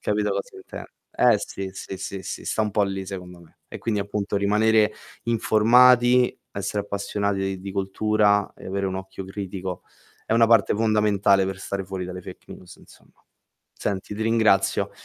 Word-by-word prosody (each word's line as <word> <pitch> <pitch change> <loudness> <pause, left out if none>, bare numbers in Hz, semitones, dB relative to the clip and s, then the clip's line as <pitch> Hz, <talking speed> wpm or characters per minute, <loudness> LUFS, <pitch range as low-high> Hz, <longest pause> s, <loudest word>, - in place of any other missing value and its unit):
capito 105 0 0
cosa 100 0 -4
inten - - -9 0.3
eh 120 -4 +4
sì, 95 -1 -6
sì, 95 0 -7
sì, 95 -1 -6
sì, - - -6
sta 110 - 0
un 105 - -1
po' 105 - +2
lì 95 -1 -4
secondo 90 -2 -8
me. 85 - -21
E - - -8
quindi, 105 -3 -1
appunto, 100 0 -3
rimanere 105 +2 +3 0.3
informati, 120 +2 +4
essere 100 +1 -3
appassionati 100 -1 -2
di 100 0 -7
cultura 105 +1 +1
e - - -12
avere 100 +1 -2
un 95 - -3
occhio 95 0 -7
critico 95 -1 -6 0.4
è - - -1
una 115 0 +5
parte 115 -4 +4
fondamentale 105 -3 +3
per 95 0 -4
stare 100 0 -4
fuori 95 -1 -5
dalle 90 0 -7
fake 90 0 -11
news, 90 0 -13
insomma. - - -20 0.6
Senti, 100 +1 -4
ti 110 - -3
ringrazio. 110 -4 +2
100 Hz, 165 wpm, -24 LUFS, 95-110 Hz, 0.6 s, una